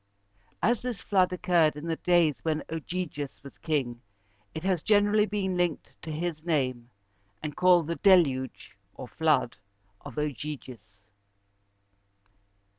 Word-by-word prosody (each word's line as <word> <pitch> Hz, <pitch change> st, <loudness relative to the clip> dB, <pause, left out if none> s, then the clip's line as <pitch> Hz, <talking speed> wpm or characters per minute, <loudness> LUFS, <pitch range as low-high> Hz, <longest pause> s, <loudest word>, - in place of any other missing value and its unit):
As 235 Hz, +4 st, +2 dB
this 245 Hz, -4 st, -4 dB
flood 185 Hz, -3 st, +2 dB
occurred 175 Hz, -5 st, +2 dB
in 150 Hz, +2 st, -7 dB
the 165 Hz, -1 st, -1 dB
days 175 Hz, -4 st, +2 dB
when 155 Hz, -1 st, -1 dB
Og´y 175 Hz, +3 st, -3 dB
ges 145 Hz, -2 st, -7 dB
was 125 Hz, -8 st, -12 dB
king, 125 Hz, -4 st, -2 dB, 0.5 s
it 160 Hz, -, -5 dB
has 185 Hz, -4 st, +1 dB
generally 210 Hz, +1 st, +3 dB
been 195 Hz, -2 st, -2 dB
linked 175 Hz, -3 st, -1 dB
to 160 Hz, -, -6 dB
his 160 Hz, 0 st, -3 dB
name, 130 Hz, -7 st, -1 dB, 0.5 s
and 150 Hz, -1 st, -4 dB
called 180 Hz, -2 st, +5 dB
the 170 Hz, +2 st, -3 dB
Deluge 140 Hz, -, +2 dB, 0.2 s
(or 130 Hz, -, -8 dB
flood) 150 Hz, -4 st, +1 dB, 0.5 s
of 145 Hz, -5 st, -9 dB
Ogyges. 130 Hz, -7 st, -6 dB
160 Hz, 130 wpm, -28 LUFS, 145-180 Hz, 0.5 s, called